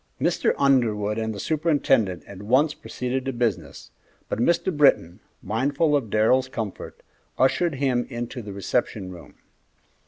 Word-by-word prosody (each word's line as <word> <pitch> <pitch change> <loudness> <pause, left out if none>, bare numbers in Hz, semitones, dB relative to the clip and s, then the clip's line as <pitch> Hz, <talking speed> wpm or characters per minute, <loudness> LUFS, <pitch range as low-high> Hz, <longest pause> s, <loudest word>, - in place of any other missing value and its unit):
Mr. - - +1
Underwood 115 -6 +2
and 110 0 -2
the 100 - -7
superintendent 140 - +1
at 100 -1 -11
once 130 +8 +2
proceeded 125 -1 -4
to 135 - -1
business, 120 -5 -3 0.4
but - - -2
Mr. 170 +6 +1
Britton, 140 - +3 0.2
mindful 145 +7 +1
of 130 -7 -1
Darrell's 125 +5 +2
comfort, 110 -6 -6 0.3
ushered 145 +5 +2
him 130 -3 0
into 120 0 -5
the 105 -2 -8
reception 100 0 -2
room. 85 -2 -13
120 Hz, 135 wpm, -24 LUFS, 105-140 Hz, 0.4 s, Britton